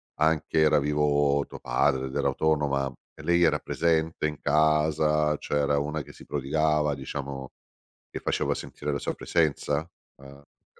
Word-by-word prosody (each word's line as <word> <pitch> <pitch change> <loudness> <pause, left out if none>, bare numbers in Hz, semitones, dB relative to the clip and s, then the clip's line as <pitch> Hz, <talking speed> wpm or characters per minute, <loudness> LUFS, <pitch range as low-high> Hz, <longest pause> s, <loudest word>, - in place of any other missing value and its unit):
anche 80 0 +1
era 75 -1 +5
vivo 75 -1 +2
tuo - - -10
padre 65 +2 +1
ed 65 - -8
era - - +1
autonoma, 70 -4 0 0.3
lei 85 0 +3
era 80 - +3
presente 80 -1 0
in 75 -1 -6
casa, 75 0 +2
cioè 75 - -2
era 70 0 +2
una 75 +2 -2
che 75 +1 -12
si - - -14
prodigava 75 +1 0
diciamo 70 0 -6 0.6
che - - -6
faceva - - 0
sentire 75 0 -5
la 70 - -1
sua - - -3
presenza? 80 -1 0 0.3
Uhm, 70 0 -14
il 70 +1 -19
75 Hz, 155 wpm, -27 LUFS, 70-75 Hz, 0.6 s, era